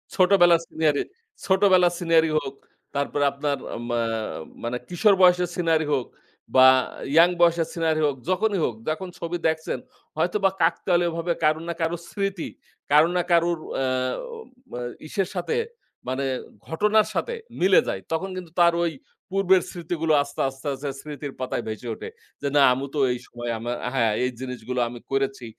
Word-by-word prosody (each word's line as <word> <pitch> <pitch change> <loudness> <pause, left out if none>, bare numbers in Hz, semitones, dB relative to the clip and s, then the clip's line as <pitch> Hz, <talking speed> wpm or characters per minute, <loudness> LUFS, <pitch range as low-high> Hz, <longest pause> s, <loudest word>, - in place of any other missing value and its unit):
ছোটবেলার 180 -3 +5
scenery 150 -3 +1 0.4
ছোটবেলার 190 -2 +4
scenery 165 -2 +3
হোক। 135 -2 -7 0.4
তারপরে 140 +1 0
আপনার 140 0 -2
য়া - - -6
মা 120 0 0 0.6
মানে 120 +1 -2
কিশোর 195 +3 +4
বয়সের 180 -1 +5
scenery 165 -3 +1
হোক 130 -3 0 0.5
বা, 130 0 +9 0.5
young 175 +2 +7
বয়সের 170 -1 +4
scenery 160 -2 0
হোক, 145 -2 0
যখনই 195 +1 +1
হোক, 115 - -2
যখন 170 +5 -3
ছবি 170 +1 -3
দেখছেন, 160 0 -2 0.4
হয়তোবা 195 +4 +2
কাকতালীয়ভাবে 175 -1 +1
কারো 155 +1 +3
না 170 - -2
কারো 165 +1 0
স্মৃতি, 195 -4 -3 0.4
কারো 150 +3 +6
না - - +3
কারোর 170 0 +3 0.2
আ - - +1
আম 255 - -4
অ - - -4 0.3
ইসের 190 +3 -1
সাথে 175 - -1 0.5
মানে 130 +2 -1 0.4
ঘটনার 210 +6 +2
সাথে 475 - -2 0.3
মিলে 185 +1 +6
যায়। - - -3
তখন 175 +4 -1
কিন্তু 175 -3 -8
তার 170 -1 +6
ঐ - - +2 0.4
পূর্বের 190 -1 +3
স্মৃতিগুলো 165 -2 -1
আস্তে, 140 0 -6
আস্তে, 135 +2 -10
আস্তে 140 +2 -5
স্মৃতির 145 -2 -7
পাতায় 130 -2 -2
ভেসে 110 +2 -6
ওঠে। - - -8 0.3
যে, 140 - -1
না, 145 - +6
"আমু 135 +2 -3
তো 145 - 0
এই 125 - -5
সময় 120 0 -5
আমার" 120 +2 -3 0.2
হ্যাঁ, 115 -5 +2
"এই 125 - 0
জিনিসগুলো 125 -1 -4
আমি 120 0 -9
করেছি 135 -2 -1
165 Hz, 160 wpm, -24 LUFS, 135-180 Hz, 0.6 s, বা